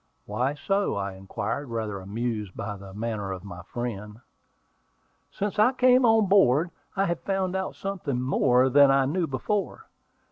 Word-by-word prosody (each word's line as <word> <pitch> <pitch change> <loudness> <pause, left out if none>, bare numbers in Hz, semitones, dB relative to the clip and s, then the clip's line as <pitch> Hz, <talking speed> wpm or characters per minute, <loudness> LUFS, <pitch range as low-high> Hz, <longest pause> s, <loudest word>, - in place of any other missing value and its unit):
"Why 125 +7 -1
so?" 195 +7 0
I 100 0 -2
inquired, 100 +8 -4
rather 110 -4 -3
amused 105 0 -4
by 105 0 -4
the 100 -1 -11
manner 105 -1 -4
of 95 -1 -6
my 90 -3 -9
friend. 105 0 -6 1.1
"Since 205 +1 -3
I 245 +5 +5
came 255 0 +5
on 225 -1 +5
board, 175 -4 +4 0.2
I 195 0 +2
have 170 -2 -1
found 190 -1 -1
out 190 0 -3
something 180 -10 -3
more 130 0 +3
than 140 +1 +6
I 135 0 +4
knew 165 +5 0
before. 200 - -2
130 Hz, 155 wpm, -26 LUFS, -, 1.1 s, than